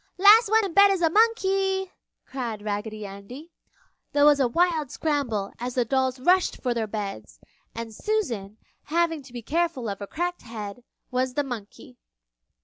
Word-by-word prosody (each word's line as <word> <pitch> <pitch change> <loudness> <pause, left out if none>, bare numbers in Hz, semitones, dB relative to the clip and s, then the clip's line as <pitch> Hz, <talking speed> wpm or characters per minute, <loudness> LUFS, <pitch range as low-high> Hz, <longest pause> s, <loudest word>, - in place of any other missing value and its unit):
"Last 415 +3 +7
one 440 0 +4
in 375 - -5
bed 400 +2 +7
is 380 -3 0
a 325 - +3
monkey!" 390 -3 +2 0.3
cried 235 -6 -5
Raggedy 210 0 -4
Andy. 205 - -10 0.6
There 290 0 +4
was 295 -1 +6
a 265 - +3
wild 325 +1 +1
scramble 245 -12 -2
as 245 +1 -4
the 245 -2 +2
dolls 260 +1 0
rushed 360 +7 +2
for 250 -2 -1
their 225 -2 -2
beds, 200 - -6 0.4
and 230 -1 -6
Susan, 230 - -2 0.3
having 330 0 0
to 260 -2 -15
be 240 -1 -7
careful 325 -4 -1
of 200 -2 -4
her 200 - -6
cracked 350 - -3
head, 220 0 -8 0.3
was 255 0 -1
the 290 - +1
monkey. 245 0 -9
265 Hz, 165 wpm, -25 LUFS, 225-350 Hz, 0.6 s, Last